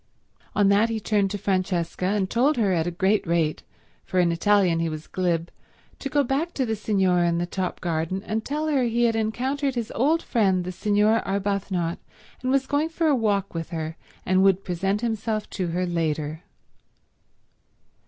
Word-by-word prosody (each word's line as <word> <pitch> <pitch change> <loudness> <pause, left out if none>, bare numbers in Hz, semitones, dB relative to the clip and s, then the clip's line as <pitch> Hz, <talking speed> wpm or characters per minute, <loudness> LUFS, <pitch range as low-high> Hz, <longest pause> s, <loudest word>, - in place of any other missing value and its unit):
On 205 -1 +4
that 205 +3 +4
he 225 -1 -2
turned 205 -2 +1
to 205 - -3
Francesca, 185 -2 -1
and 200 -1 +1
told 255 +8 +2
her 205 -5 +2
at 165 -1 0
a - - +1
great 190 +4 +1
rate, 165 -2 +1 0.4
for 185 - -1
in 175 -1 +3
Italian 180 -1 +3
he 165 0 0
was 155 0 -6
glib, 175 -3 -1 0.5
to 275 - -4
go 290 +1 +2
back 280 +7 -1
to 265 - 0
the 220 -1 -1
Signora 190 -5 +2
in 170 - 0
the 175 - 0
top 180 +1 -4
garden 170 +3 -2
and 220 +1 -2
tell 300 +5 -2
her 295 -4 +2
he 240 -1 +1
had 230 -1 +3
encountered 260 +5 -1
his 235 -2 -3
old 310 +7 +2
friend 190 -6 +2
the 180 - -4
Signora 210 +3 +2
Arbuthnot, 195 -3 -1 0.4
and 255 - -2
was 270 0 +2
going 290 +3 0
for 330 0 -1
a 300 -3 +4
walk 205 -5 0
with 165 -1 -4
her 160 -2 -4 0.3
and 185 0 +3
would 195 0 +4
present 195 +4 -1
himself 220 -2 -2
to 185 -3 -2
her 175 +2 -1
later. 155 -2 -2
200 Hz, 185 wpm, -25 LUFS, 175-230 Hz, 0.5 s, On